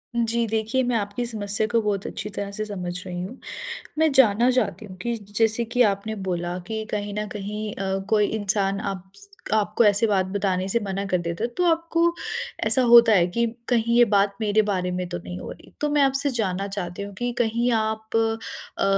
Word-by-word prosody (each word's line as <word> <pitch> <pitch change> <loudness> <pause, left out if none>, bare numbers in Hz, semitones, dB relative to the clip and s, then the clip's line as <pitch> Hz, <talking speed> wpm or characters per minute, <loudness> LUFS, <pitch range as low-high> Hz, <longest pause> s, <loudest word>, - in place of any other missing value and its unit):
जी, 235 0 +1
देखिए 220 +4 0
मैं 245 -1 0
आपकी 205 +2 -2
समस्या 210 -2 -1
को 230 +1 +2
बहुत 205 -2 -1
अच्छी 210 - -5
तरह 200 -1 -5
से 215 +2 -4
समझ 185 -4 -5
रही 180 -1 -4
हूँ। 195 +9 -7 0.6
मैं 315 0 +4
जानना 240 -2 +5
चाहती 220 -5 -1
हूँ 185 -2 -10
कि 235 +2 -1
जैसे 220 +2 0
कि 245 +2 +2
आपने 200 +3 -5
बोला 175 0 -2
कि 220 +1 -3
कहीं 205 -1 -3
न 210 - -2
कहीं 210 +1 -5
अ, 195 0 -2
कोई 210 -1 +3
इंसान 200 -2 0
आप्स 195 - -7 0.3
आपको 215 +2 +2
ऐसे 205 +2 +4
बात 195 -3 +2
बताने 190 -1 -1
से 235 +4 +1
मना 195 0 -2
कर 180 - +3
देता 170 +4 -3
है, - - 0
तो 360 - +1
आपको 335 0 +1 0.7
ऐसा 225 +4 +5
होता 235 -1 +9
है 180 -4 +5
कि 235 +7 0 0.2
कहीं 235 -1 +2
ये 240 - +8
बात 200 -2 +2
मेरे 215 0 +3
बारे 185 -3 -1
में 180 0 -2
तो 175 0 -4
नहीं 180 +1 -7
हो - - -7
रही? - - -13
तो 300 - +1
मैं 295 -1 +3
आपसे 275 +1 +2
जानना 200 -6 -1
चाहती 190 -2 -5
हूँ 200 0 -7
कि 245 0 -1
कहीं 235 +1 +1
आप 220 0 -1
अ - - +5
अ, 225 0 -3
210 Hz, 210 wpm, -24 LUFS, 195-235 Hz, 0.7 s, होता